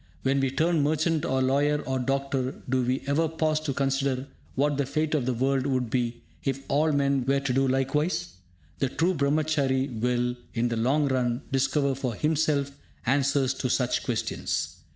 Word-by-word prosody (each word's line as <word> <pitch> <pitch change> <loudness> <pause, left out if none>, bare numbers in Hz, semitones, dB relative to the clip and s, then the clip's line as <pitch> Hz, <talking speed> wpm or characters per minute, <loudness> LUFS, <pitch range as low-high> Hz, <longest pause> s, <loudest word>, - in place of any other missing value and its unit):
When 135 +1 +2
we 135 -1 +1
turn 160 +4 +1
merchant 155 +2 +1
or 130 0 +1
lawyer 145 +3 +2
or 130 0 -1
doctor, 135 0 -2
do 130 0 +1
we 125 +2 -1
ever 150 +4 +1
pause 155 -1 0
to 155 -2 -3
consider 135 -1 0 0.3
what 145 +1 +1
the 140 - +1
fate 155 +2 -1
of 140 -5 0
the 130 - +1
world 135 +2 +1
would 130 -4 -1
be 120 -2 -1 0.2
if 135 0 -2
all 155 +3 +3
men 140 -2 +2
were 135 +2 +2
to 135 -2 -1
do 135 +1 +2
likewise? 150 +7 0 0.5
The 135 - +1
true 170 +7 +1
Brahmachary 140 -3 +1
will, 125 0 0 0.2
in 120 +1 +1
the 115 - -1
long 135 +6 +2
run, 125 -1 0
discover 140 +1 +1
for 130 -3 -3
himself 150 0 +1 0.3
answers 135 +1 +2
to 130 - -3
such 125 0 +1
questions. 120 -5 -2
135 Hz, 175 wpm, -27 LUFS, 130-145 Hz, 0.5 s, all